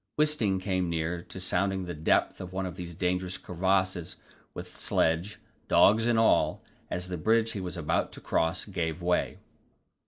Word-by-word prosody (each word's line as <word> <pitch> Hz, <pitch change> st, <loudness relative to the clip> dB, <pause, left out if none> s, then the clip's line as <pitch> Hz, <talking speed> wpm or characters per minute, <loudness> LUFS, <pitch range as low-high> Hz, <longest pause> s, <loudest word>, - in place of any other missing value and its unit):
Wisting 150 Hz, -11 st, +2 dB
came 95 Hz, -2 st, -1 dB
near 85 Hz, +1 st, -2 dB
to 95 Hz, -, -8 dB
sounding 95 Hz, +1 st, 0 dB
the 90 Hz, -, -5 dB
depth 75 Hz, 0 st, +1 dB
of 90 Hz, -1 st, -7 dB
one 95 Hz, 0 st, -2 dB
of 90 Hz, -1 st, -5 dB
these 85 Hz, -2 st, -7 dB
dangerous 90 Hz, +1 st, -1 dB
crevasses 95 Hz, -1 st, -1 dB, 0.4 s
with -, -, -8 dB
sledge, 80 Hz, +6 st, 0 dB, 0.3 s
dogs 110 Hz, +3 st, +5 dB
and 120 Hz, -1 st, +3 dB
all, 115 Hz, 0 st, +3 dB, 0.3 s
as 90 Hz, +1 st, -3 dB
the 90 Hz, -1 st, -4 dB
bridge 115 Hz, +4 st, +2 dB
he 100 Hz, -, -4 dB
was 90 Hz, -1 st, -5 dB
about 80 Hz, -3 st, 0 dB
to -, -, -8 dB
cross 80 Hz, +2 st, 0 dB
gave 85 Hz, -5 st, -3 dB
way. 90 Hz, 0 st, +1 dB
90 Hz, 165 wpm, -29 LUFS, 85-100 Hz, 0.4 s, dogs